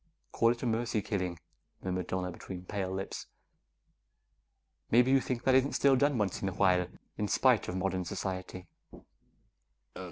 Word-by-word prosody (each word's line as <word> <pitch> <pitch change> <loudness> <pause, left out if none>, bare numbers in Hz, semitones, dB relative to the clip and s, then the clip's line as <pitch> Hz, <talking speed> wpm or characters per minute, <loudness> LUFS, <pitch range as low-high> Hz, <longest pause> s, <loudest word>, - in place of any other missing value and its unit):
"Call 115 - +3
it 120 +1 -1
a - - 0
mercy 115 -2 0
killing," 90 -5 -2 0.5
murmured 90 -1 -2
Donna 90 -1 -2
between 90 +1 -8
pale 95 -1 -3
lips. 95 +1 -5 1.6
"Maybe 125 +3 +5
you 135 0 +5
think 125 -1 -3
that 130 - +4
isn't 130 +2 +3
still 140 -1 +4
done 140 +1 +2
once 100 -4 -1
in 95 - 0
a - - -6
while, 90 -2 +3 0.3
in 105 - 0
spite 125 0 +3
of 90 - -3
modern 95 -1 -1
society." 95 -1 -5
100 Hz, 155 wpm, -31 LUFS, 95-120 Hz, 1.6 s, Maybe